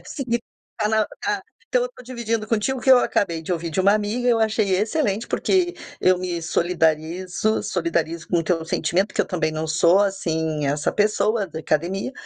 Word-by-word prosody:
é - - -21
seguir 240 -5 -2 0.4
pra 210 - +1 0.3
pra - - -1 0.3
então - - +2
eu - - 0
estou - - -14
dividindo 230 -3 -3
contigo 230 +4 0
o - - -8
que 265 - +3
eu 260 - +9
acabei 170 -8 0
de 180 - -3
ouvir 170 -1 -3
de 175 - 0
uma 200 +2 +5
amiga, 215 +4 0
eu 235 -2 +4
achei 220 -2 +1
excelente 220 0 0
porque 360 -2 +1 0.3
eu 185 0 +4
me 180 -1 -3
solidarizo 170 +4 0
solidarizo 170 -2 -2
com 175 - +2
o - - +1
teu 165 -1 0
sentimento 180 +4 0
porque - - -1
eu - - 0
também 165 -4 -1
não 155 +1 -3
sou 170 +3 +4
assim 160 -6 0
essa 145 +1 0
pessoa 210 +1 +1
da 160 -3 -7
academia, 170 - -1
190 Hz, 195 wpm, -22 LUFS, 165-220 Hz, 0.4 s, eu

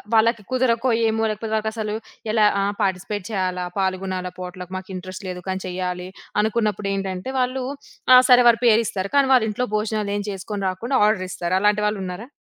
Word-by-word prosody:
వాళ్ళకి 225 -1 +3
కుదరకో, 255 -1 +2 0.2
ఏమో 225 0 +1
లేకపోతే 220 +1 -4
వాళ్ళకసలు 220 0 -2 0.4
ఎలా 215 -2 +4 0.2
ఆహ్, 200 +1 0
పార్టిసిపేట్ 190 +1 -2
చేయాలా, 185 -2 -1
పాల్గొనాలా 185 -1 -2
పాట్‌లక్, 180 0 -7
మాకు 185 +1 -9
ఇంట్రెస్ట్ 185 +1 -7
లేదు 180 0 -6
కానీ 190 0 -2
చెయ్యాలి, 180 0 -3 0.3
అనుకున్నప్పుడు 210 -2 0
ఏంటంటే 195 +5 -4
వాళ్ళు, 255 +1 0 0.5
ఆ! 255 - +11
సరే 250 0 +8
వారి 230 0 +3
పేరిస్తారు 210 -4 +2
కానీ, 275 -1 +4
వాళ్ళ 245 -4 +5
ఇంట్లో 250 +4 -2
భోజనాలేమి 210 -1 -2
చేసుకొని 200 +1 -5
రాకుండా, 235 +9 -1
ఆర్డరిస్తారు. 185 -3 -1
అలాంటి 210 0 +3
వాళ్ళున్నారా? 195 +1 -4
205 Hz, 155 wpm, -22 LUFS, 185-225 Hz, 0.5 s, ఆ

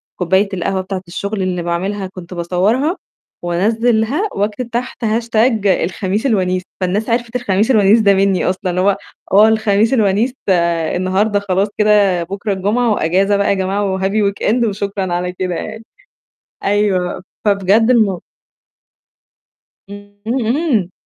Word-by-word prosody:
كوباية 190 +3 +1
القهوة 190 +1 -1
بتاعة 185 0 -5
الشغل 200 +3 -4
اللي 180 -2 -2
باعملها، 190 +3 -2
كنت 185 -1 -10
باصورها، 195 - 0 0.5
وأنزلها 225 - +1
وأكتب 210 +4 -2
تحت 240 0 -4
hashtag 225 0 +1
الخميس 190 +4 0
الونيس. 185 -7 +1 0.2
فالناس 195 +5 -1
عرفِت 235 +1 -1
الخميس 215 -1 +1
الونيس 215 -1 +5
ده 200 -2 +4
مني 195 -1 +1
أصلًا. 185 0 -1
اللي 180 +1 0
هو 195 +1 +2 0.3
آه، 210 +3 +6
الخميس 220 +1 +2
الونيس 220 +1 +2
ده 195 - +4 0.4
النهارده، 195 +3 +1
خلاص 195 0 0
كده، 205 -4 +3
بكرة 200 +4 -3
الجمعة 215 +5 0
وأجازة 195 +3 +1
بقى 200 - +1
يا - - +4
جماعة، 195 0 -1
وhappy 200 +1 +1
weekend 235 +4 0
وشكرًا 200 -3 -3
على 180 +1 -2
كده 180 -1 -3
يعني. 220 +5 -6 0.8
أيوه، 195 -4 0 0.2
فبجد 205 +3 +3
المو 210 -7 +2 1.7
امم، 205 0 -12
امم. 235 - 0
200 Hz, 135 wpm, -17 LUFS, 185-220 Hz, 1.7 s, آه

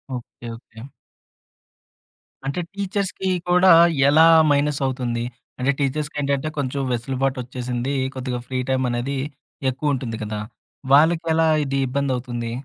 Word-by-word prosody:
Okay. 120 0 -9
Okay. 115 -1 -14 1.6
అంటే, 140 +5 -2
టీచర్స్‌కి 195 -1 -2 0.2
కూడా 180 +1 +6 0.4
ఎలా 155 +3 +6 0.3
మైనసవుతుంది? 135 -5 0 0.4
అంటే 130 +2 +2
టీచర్స్‌కేంటంటే 145 0 -1
కొంచెం 140 0 -2
వెసులుబాటొచ్చేసింది. 125 0 -2 0.2
కొద్దిగా 130 -1 -3
ఫ్రీ 130 -1 -2
టైమ్ 130 0 +1
అనేది 125 +4 -2 0.5
ఎక్కువ 145 +3 -1
ఉంటుంది 120 -4 -4
కదా. 105 0 -4 0.5
వాళ్ళకి 160 +4 +5
ఎలా 160 0 +3 0.2
ఇది 135 0 -1
ఇబ్బందవుతుంది? 125 -3 -2
135 Hz, 105 wpm, -22 LUFS, 125-145 Hz, 1.6 s, కూడా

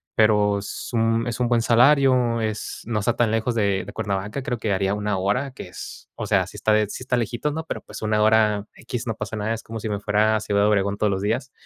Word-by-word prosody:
pero 105 -2 +3
es 100 - -6
un 115 0 +2
es 120 0 -3
un 125 - +2
buen 120 -1 +2
salario, 125 -1 +4
es 110 -1 -4
no 110 -2 -1
está 115 +3 0
tan 115 -2 +2
lejos 115 +2 0
de 100 -3 +1
de - - -9
Cuernavaca, 100 +6 -3
creo 125 - -2
que 110 -2 -1
haría 95 +1 0
una 105 -1 -1
hora 105 +9 0
que 95 - -9
es, - - -10
o - - -4
sea, - - +3
sí - - -11
está, 110 0 +3
eh, 105 -1 +1
sí 130 - -6
está 130 0 0
lejitos, 120 +5 -2
¿no? 160 +1 -3
Pero - - -4
pues, - - -10
una 110 -1 +1
hora, 105 -1 +3
equis, 120 0 -6
no 115 - -1
pasa 110 - -5
nada, 105 +2 -1
es 115 - -6
como 115 0 -7
si 110 - -4
me 105 -1 -2
fuera 105 +1 +2
a - - +1
Ciudad 100 -1 0
de - - +4
Obregón 100 -1 +1
todos 105 - +1
los 95 0 -1
días, 120 +6 -1
110 Hz, 265 wpm, -23 LUFS, 105-120 Hz, -, salario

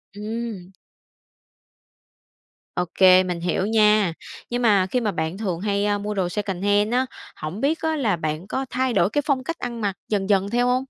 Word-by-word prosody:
Ừm. 215 -3 -5 2.0
Ok, 180 +1 -4 0.2
mình 180 -2 -3
hiểu 180 +2 0
nha. 210 -4 +4 0.4
Nhưng 245 0 -1
mà 200 -5 +4
khi 250 - +2
mà 215 - 0
bạn 160 +1 -3
thường 185 -6 -2
hay, 200 0 0
a, 205 0 +1
mua 210 +1 -4
đồ 185 -3 -1
secondhand 205 +2 0
á, 255 +1 +2 0.3
hổng 160 +8 -6
biết 305 +4 +1
á 320 0 0
là 225 -10 +1
bạn 155 +2 -4
có 265 +5 -2
thay 255 0 0
đổi 180 -1 +3
cái 290 +6 0
phong 275 -4 +1
cách 330 +4 -4
ăn 235 -2 -5
mặc 200 -2 -1
dần 200 -1 -1
dần 200 0 +2
theo 245 +2 +1
hông? 255 +1 +2
210 Hz, 185 wpm, -23 LUFS, 190-240 Hz, 2.0 s, nha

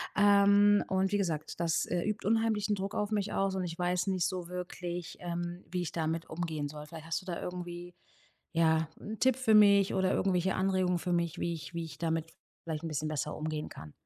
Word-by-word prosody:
Ähm, 205 0 +6
und 190 0 +1
wie 205 - +2
gesagt, 165 -7 -2
das, 170 -1 +1
äh, 175 0 0
übt 210 0 -2
unheimlichen 220 -2 +2
Druck 195 0 -4
auf 210 0 -1
mich 205 -1 -1
aus. 195 -1 +1
Und 185 -1 -1
ich 165 -1 -5
weiß 180 +1 0
nicht 185 -3 +1
so 180 -2 -4
wirklich, 180 -1 -5
ähm, 175 0 -4
wie 180 +1 -2
ich 175 - -3
damit 165 0 -2
umgehen 160 -3 -3
soll. 150 0 -8
Vielleicht 160 0 -10
hast 165 +3 -1
du - - -17
da 175 -3 -4
irgendwie, 175 0 -6 0.6
ja, 160 -1 +3
'n 215 +1 -7
Tipp 260 -2 +4
für 255 -4 +3
mich 200 -2 +6
oder 190 0 +2
irgendwelche 185 -1 +1
Anregungen 185 -1 +1
für 180 +1 -2
mich, 170 -2 0
wie 170 - 0
ich 165 +1 -8
wie 170 0 -2
ich 155 -2 -10
damit 165 0 -1 0.3
vielleicht 160 -1 -4
'n - - -2
bisschen 155 0 -2
besser 150 0 -2
umgehen 155 0 -3
kann? 75 -1 -10
175 Hz, 215 wpm, -31 LUFS, 165-195 Hz, 0.6 s, Ähm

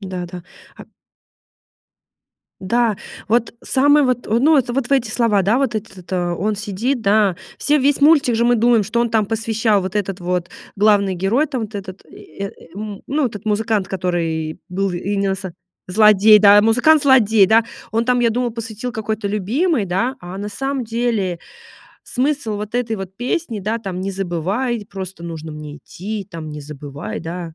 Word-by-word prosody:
Да-да. 180 -2 -6 0.3
А - - -11 1.8
Да. 225 +2 +1 0.3
Вот 230 +1 +1
самый 290 +2 +4
вот, 250 -2 -1
э, - - -9
ну, 300 +5 +4
это 245 -2 +1
вот 265 0 -1
в - - -1
эти 265 -3 +2
слова, 215 -5 +2
да, 215 +7 +2
вот 265 -4 0
это 210 -3 -6
то. 175 -1 -2
Он 210 +3 0
сидит, 215 +6 -2
да. 200 -3 +3 0.2
Все 295 0 +2
весь 280 +2 +2
мультик 285 -5 +5
же 235 - +2
мы 240 0 +4
думаем, 235 -1 +4
что 225 +4 -1
он 235 -1 0
там 215 -3 +2
посвящал 220 -2 +1
вот 190 +2 -4
этот 195 -2 -2
вот 180 0 -2 0.3
главный 200 -2 +3
герой, 200 - +1
там 265 -5 -3
вот 215 0 -7
этот 190 -1 -7
и, 200 - -12
э, 195 - -5 0.2
м, 205 -1 -7
ну, 285 -1 +1
этот 210 -2 -7
музыкант, 215 -2 0
который 165 -4 -2
был 195 +2 -1
именно 195 +2 -1
со 190 -2 -6 0.3
злодей, 210 +2 +6
да, 205 0 +7
музыкант-злодей, 245 -3 +5
да. 225 +3 +4 0.3
Он 225 +2 0
там, 250 0 +2
я 235 - +3
думала, 245 +1 -1
посвятил 225 +1 -6
какой-то 220 -1 -3
любимой, 225 - 0
да. 215 +9 -1
А 180 +2 -8
на 205 +1 -4
самом 270 +4 -3
деле 225 -6 -1 0.6
смысл 260 -4 -1
вот 210 +2 -6
этой 240 -2 -1
вот 190 -1 -8
песни, 245 -1 -2
да, 215 +4 -2
там: 190 -5 -5
"Не 195 +1 -2
забывай, 195 +6 -2
просто 190 -4 -7
нужно 160 -2 -7
мне 150 -1 -8
идти, 205 +3 -6
там, 160 -2 -7
не 150 0 -7
забывай", 145 +1 -7
да. 165 -1 -6
210 Hz, 175 wpm, -19 LUFS, 190-240 Hz, 1.8 s, да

